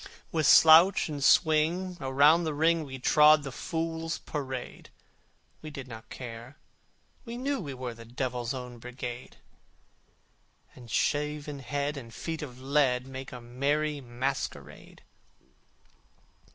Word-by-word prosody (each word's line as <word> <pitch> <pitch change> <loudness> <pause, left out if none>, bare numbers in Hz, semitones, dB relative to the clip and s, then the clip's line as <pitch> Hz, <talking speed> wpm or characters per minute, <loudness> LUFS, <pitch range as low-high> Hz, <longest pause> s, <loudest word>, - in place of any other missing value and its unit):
With 155 -3 +1
slouch 165 +3 +7
and 145 -2 -4
swing 165 +6 +3
around 145 +5 +4
the 155 -2 -2
ring 165 +2 +2
We 135 -1 -7
trod 150 +3 +5
the 135 - -6
Fools' 165 +3 -3
Parade! 130 -4 -6 0.7
We 155 - -8
did 140 -3 -8
not 115 -2 -11
care: 120 +1 -9 0.7
we 235 -1 -7
knew 275 +2 -2
we 145 -8 -6
were 125 -1 -5
The 115 0 -12
Devils' 125 0 -3
Own 125 -2 -7
Brigade: 125 0 -8 1.4
And 120 -2 -14
shaven 150 +2 -1
head 145 +2 -3
and 115 -4 -9
feet 160 +6 -5
of 130 -4 -8
lead 130 -2 +1
Make 135 0 -8
a 125 - -8
merry 145 +5 -1
masquerade. 120 - -5
140 Hz, 125 wpm, -28 LUFS, 125-155 Hz, 1.4 s, slouch